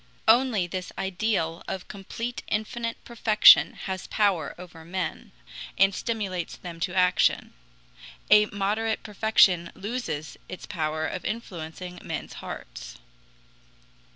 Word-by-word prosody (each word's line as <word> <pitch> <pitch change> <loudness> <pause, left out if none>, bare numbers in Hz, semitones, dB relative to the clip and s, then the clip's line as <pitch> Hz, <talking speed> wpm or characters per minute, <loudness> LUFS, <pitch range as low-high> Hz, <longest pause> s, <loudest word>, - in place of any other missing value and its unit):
Only 225 -4 +4
this 180 +1 -5
ideal 190 -3 -1
of 190 - -5
complete 230 +5 -6
infinite 230 +2 -2
perfection 220 -2 +6
has 190 -1 -4
power 200 -6 +1
over 175 -2 -11
men, 185 +4 -4 0.5
and 195 0 +5
stimulates 195 -6 -3
them 170 -2 -9
to 180 +2 -2
action. 180 -1 +2 0.8
A 210 0 +7
moderate 210 +3 -1
perfection 200 -5 +3
loses 200 -9 -4
its 185 - -7
power 155 -3 -2
of 180 - -4
influencing 180 -4 -6
men's - - -5
hearts. - - -8
190 Hz, 110 wpm, -26 LUFS, 175-215 Hz, 0.8 s, A